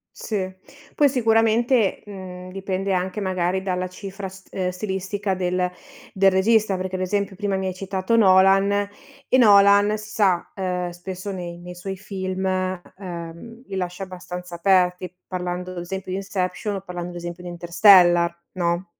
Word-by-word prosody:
Sì. 190 -4 -3 0.4
Poi 290 - +4
sicuramente, 225 -2 +2
mhmm, 185 -2 -9
dipende 195 0 -3
anche 185 +3 -1
magari 185 0 0
dalla 185 -1 -1
cifra 195 +1 -7
st 190 0 -13
ehm, 185 -1 -1
stilistica 190 +1 -3
del 180 0 0 0.4
del 195 0 +4
regista, 205 +1 +3
perché, 185 0 -3
ad - - -4
esempio, 200 +1 -1
prima 200 -2 -1
mi 190 0 -2
hai 185 - -2
citato 190 +3 -1
Nolan, 195 0 +5 0.6
e 255 - +5
Nolan, 205 -1 +6
si 215 0 -10
sa, 190 -5 +1
ehm, 180 -2 -2
spesso 185 +3 -6
nei 175 -2 -6
nei 180 0 -9
suoi 190 +2 -5
film, 190 -1 -4
ehm, 185 +3 -5
li 195 - -6
lascia 180 +1 -3
abbastanza 180 -1 -7
aperti, 180 0 +2
parlando, 180 0 -4
ad 180 - -9
esempio, 185 +2 -5
di 185 - -1
Inception 195 +1 -2
o 190 - -4
parlando, 180 -2 -6
ad - - -11
esempio, 175 +1 -7
di 175 - -6
Interstellar, 175 0 +5 0.2
no? 175 0 -1
185 Hz, 160 wpm, -23 LUFS, 180-200 Hz, 0.6 s, Nolan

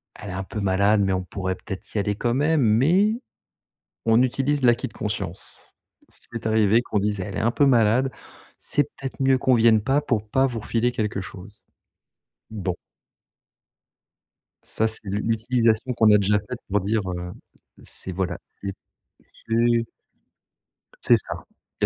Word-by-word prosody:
Elle 105 - -9
est - - -5
un 95 +1 -3
peu 105 +3 -6
malade, 100 +1 +3
mais 95 -1 +1
on 95 0 -1
pourrait 95 0 -3
peut 95 - -7
être 95 - -10
y - - +2
aller 105 0 0
quand 120 +3 0
même. 150 +4 +2
Mais 160 - +3 0.9
on 115 +1 +5
utilise 135 +3 0
l'acquis 120 -1 +3
de - - -16
conscience. - - -5 0.5
C'est 115 -1 -10
arrivé 110 0 +4
qu'on 110 -3 -1
dise: 105 0 -1
«Elle 100 +1 -5
est - - -1
un 115 - +2
peu 145 - +3
malade. 125 0 +3 0.5
C'est 145 - 0
peut 135 -1 -13
être 135 - -5
mieux 135 0 +4
qu'on 130 0 +2
vienne 115 -2 +5
pas 135 +6 +1
pour 110 -7 -2
pas 130 +3 +3
vous 120 -3 -4
refiler 115 +3 0
quelque 105 -4 -2
chose». 95 +2 -10 0.9
Bon. 95 -5 -3 1.9
Ça, 110 - 0
c'est 110 0 -2
l'u 100 +1 -2
l'utilisation 115 +1 +1
qu'on 110 -2 +4
a 105 - +7
déjà 105 +1 +2
faite 110 +4 -8
pour 105 0 +1
dire, 110 +3 0
heu, 90 0 -5 0.5
c'est 95 - -5
voilà, 90 -1 -2 0.2
c'est 100 -1 -4 0.5
c'est 115 +1 0 1.2
C'est - - +6
ça. - - -6 0.4
Il - - +4
110 Hz, 170 wpm, -24 LUFS, 100-125 Hz, 1.9 s, a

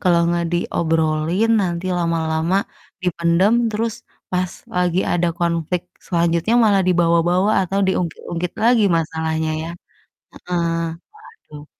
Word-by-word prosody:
Kalo 180 -3 +3
nggak 170 0 0
diobrolin 165 +3 0
nanti 175 -1 -2
lama-lama 165 +1 0 0.5
dipendam, 175 +3 +2 0.2
terus 225 +1 -1 0.4
pas 180 -1 -1 0.2
lagi 180 0 0
ada 175 0 +1
konflik 170 0 0 0.3
selanjutnya 170 +4 +1
malah 200 -3 +4
dibawa-bawa 175 +2 +2
atau 195 +2 -2
diungkit-ungkit 175 -1 -2
lagi 235 -2 +4
masalahnya 160 0 -1
ya. 165 - -5 0.7
Heeh, 170 -2 -2 0.5
waduh. 150 - -14
170 Hz, 105 wpm, -20 LUFS, 165-185 Hz, 0.7 s, malah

